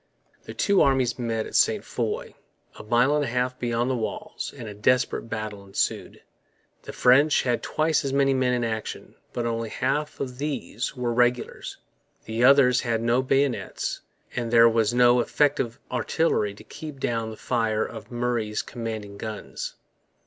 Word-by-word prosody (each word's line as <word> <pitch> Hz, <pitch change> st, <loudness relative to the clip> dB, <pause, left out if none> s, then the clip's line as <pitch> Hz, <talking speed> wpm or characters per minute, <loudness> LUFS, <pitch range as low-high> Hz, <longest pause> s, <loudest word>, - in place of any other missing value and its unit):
The -, -, -8 dB
two 200 Hz, -2 st, +3 dB
armies 130 Hz, -3 st, +2 dB
met 115 Hz, -2 st, -1 dB
at -, -, -10 dB
Ste -, -, +3 dB
Foy, -, -, -3 dB, 0.4 s
a -, -, -9 dB
mile 120 Hz, +6 st, +3 dB
and 150 Hz, -, +1 dB
a -, -, -2 dB
half 125 Hz, +1 st, -1 dB
beyond 120 Hz, 0 st, 0 dB
the -, -, 0 dB
walls; 115 Hz, -3 st, -4 dB
and 115 Hz, -, -7 dB
a 105 Hz, -, -6 dB
desperate 115 Hz, +3 st, +1 dB
battle 110 Hz, -2 st, -5 dB
ensued. 95 Hz, 0 st, -3 dB, 0.6 s
The -, -, -8 dB
French 140 Hz, +4 st, +4 dB
had 120 Hz, -2 st, 0 dB
twice 155 Hz, 0 st, +1 dB
as 135 Hz, -, -2 dB
many 135 Hz, 0 st, +3 dB
men 130 Hz, -1 st, +1 dB
in 120 Hz, -, -1 dB
action, 110 Hz, -2 st, -4 dB, 0.2 s
but 120 Hz, -, -3 dB
only 115 Hz, -1 st, -2 dB
half 145 Hz, +6 st, -2 dB
of 125 Hz, -2 st, -5 dB
these 145 Hz, -1 st, -3 dB
were 125 Hz, -2 st, -1 dB
regulars; 120 Hz, 0 st, 0 dB, 0.5 s
the 110 Hz, +2 st, -1 dB
others 130 Hz, -1 st, +6 dB
had 115 Hz, -2 st, -1 dB
no 120 Hz, +2 st, +3 dB
bayonets; 135 Hz, 0 st, -1 dB, 0.3 s
and 120 Hz, -1 st, -2 dB
there 115 Hz, 0 st, +7 dB
was 115 Hz, -1 st, +2 dB
no 120 Hz, 0 st, +5 dB
effective 135 Hz, -1 st, +1 dB
artillery 120 Hz, -4 st, 0 dB
to -, -, -13 dB
keep 150 Hz, -3 st, -9 dB
down 115 Hz, -3 st, -1 dB
the 110 Hz, -, -9 dB
fire 110 Hz, -3 st, 0 dB
of 110 Hz, -1 st, -9 dB
Murray's 120 Hz, -3 st, -1 dB
commanding 110 Hz, -4 st, -6 dB
guns. 110 Hz, -2 st, -6 dB
120 Hz, 165 wpm, -25 LUFS, 115-130 Hz, 0.6 s, there